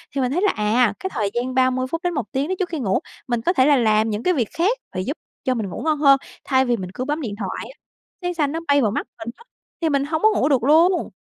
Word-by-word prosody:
Thì 275 - +1
mình 250 0 0
thấy 350 - 0
là, 415 - +3
à, 215 +1 +2
cái 380 - -3
thời 210 -4 0
gian 245 +2 -2
30 255 0 +2
phút 330 - -2
đến 355 -1 0
1 235 -9 -4
tiếng 275 +3 -1
đò 375 - -1
trước 365 - -1
khi 325 - -4
ngủ, 195 -7 +1 0.3
mình 240 -2 -1
có 355 - +1
thể 260 -8 +4
là 290 -1 +5
làm 220 -2 +3
những 210 +2 -3
cái 365 - +3
việc 240 -8 0
khác 400 +9 +2 0.2
và 185 - -3
giúp 280 - -4 0.3
cho 255 - +1
mình 220 -6 -3
ngủ - - -6
ngon 310 -2 +1
hơn, 275 -2 +6 0.3
thay 265 -1 +3
vì 240 -2 +1
mình 185 -3 -6
cứ 255 - -4
bấm 300 +2 -2
điện 210 -6 -4
thoại 195 +1 -4
á - - -35 0.4
sáng 355 0 -2
xanh 295 -4 0
nó 325 - -2
bay 285 -1 +4
vào 215 - +2
mắt - - -3
mình 225 0 -6
á, 470 - -18 0.4
thì 325 - +2
mình 280 -1 +1
hông 315 +1 -2
có 435 - +6
ngủ 285 - +2
được 260 -5 +2
luôn. 330 +6 +4
265 Hz, 300 wpm, -22 LUFS, 230-320 Hz, 0.4 s, hơn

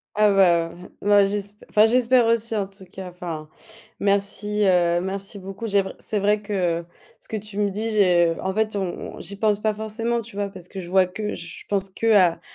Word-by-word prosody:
Ah 210 0 +5
bah, 170 -4 +4
heu, - - -14 0.3
moi 205 0 +5
j'esp 205 +1 -3
enfin 210 +1 +5
j'espère 245 +1 +4
aussi, 230 0 +1
en 200 -2 -1
tout 195 0 -16
cas. 185 0 -9
Enfin, 170 -3 -6 0.5
merci, 205 +1 0
heu, 175 -2 +3
merci 195 +2 -5
beaucoup. 195 +4 -6
J'ai 200 -2 +3
vr 190 - -7
c'est 210 - -2
vrai 205 +1 +2
que 180 -5 -1 0.4
ce - - -16
que 220 - -2
tu 210 0 -8
me 205 -1 +2
dis, 220 +3 -2
j'ai 175 -5 +4
en 190 - -2
fait, 220 +1 0
on 190 -3 -4
on, - - -10
j'y 200 0 -7
pense 210 -1 +1
pas 215 0 +1
forcément, 220 +2 -2
tu 205 - -13
vois, 205 0 -2
parce 185 -2 -12
que 190 - -7
je 175 - -9
vois 190 0 +5
que 210 +4 -4
je 170 -1 -9
pense 195 -1 0
qu'à 190 -4 +3
200 Hz, 215 wpm, -23 LUFS, 185-210 Hz, 0.5 s, Ah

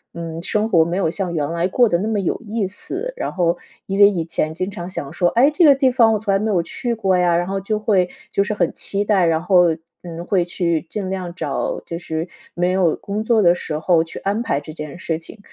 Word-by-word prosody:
“嗯， 165 -1 -5
生 210 +4 0
活 170 -7 +4
没 170 +3 -2
有 175 -5 +1
像 185 -1 -3
原 145 -2 0
来 170 +2 0
过 240 +5 +3
得 170 -3 +1
那 210 - -2
么 220 -2 0
有 190 +4 -2
意 215 -1 -1
思。” 380 - -6
然 - - -3
后 175 -1 +1 0.3
因 195 +1 -2
为 200 0 +9
以 170 -5 -2
前 155 -1 -2
经 185 +3 -3
常 175 -2 -6
想 140 -6 -6
说： 175 -1 +2
“哎， 275 +5 +6
这 340 +3 +2
个 285 -3 +8
地 265 -1 +3
方 230 -3 +4
我 - - +2
从 205 -1 -1
来 195 - +3
没 215 +2 -1
有 175 -4 +2
去 235 +6 -3
过 195 -4 +1
呀。” 175 -1 +3
然 175 - 0
后 195 0 -2
就 210 +2 -1
会 195 -4 +2 0.2
就 200 - +2
是 210 - -2
很 175 -5 0
期 200 +1 -2
待， 200 -4 +3
然 165 -1 +2
后， 175 -3 +4 0.3
嗯， 170 0 -7
会 185 -2 +2
去 170 -2 -1
尽 195 -1 -3
量 185 -2 -4
找 - - -3
就 170 - -5
是 160 -1 -4 0.3
没 175 +1 +1
有 185 -4 +2
工 210 +2 -4
作 225 -1 +3
的 175 -2 +6
时 155 -3 -4
候 165 -1 +3
去 165 - -9
安 205 +4 -1
排 225 -11 0
这 150 +2 -10
件 150 +1 -7
事 165 -2 -2
情。 185 +6 -11
185 Hz, 275 characters per minute, -20 LUFS, 170-210 Hz, 0.3 s, 为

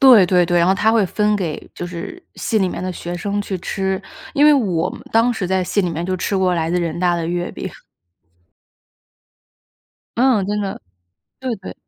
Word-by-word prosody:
对 245 -9 +8
对 180 0 +4
对， 175 0 +2
然 170 - +4
后 190 - +4
她 215 +3 +3
会 225 -2 +3
分 210 +2 +1
给 170 -6 -4
就 175 - -5
是 180 - -7
系 220 - 0
里 190 - +2
面 180 - -5
的 185 - -2
学 175 0 -5
生 205 +2 -2
去 200 -1 -3
吃， 190 +1 -2 0.3
因 285 - +4
为 300 - +8
我 185 - +1
们 - - -9
当 230 +2 +4
时 195 -5 -2
在 190 0 +1
系 205 - +1
里 180 -3 0
面 165 +1 -3
就 185 +1 -1
吃 195 +2 -1
过 185 -1 +2
来 165 -1 0
自 180 - +1
的 - - +1
人 165 0 -2
大 175 -1 +2
的 170 -1 -2
月 175 +1 -2
饼。 - - -6 2.5
嗯， 235 -6 +3
真 210 0 -1
的， 195 -1 -4 0.6
对 255 -3 -2
对。 190 - -9
190 Hz, 225 characters per minute, -20 LUFS, 175-210 Hz, 2.5 s, 对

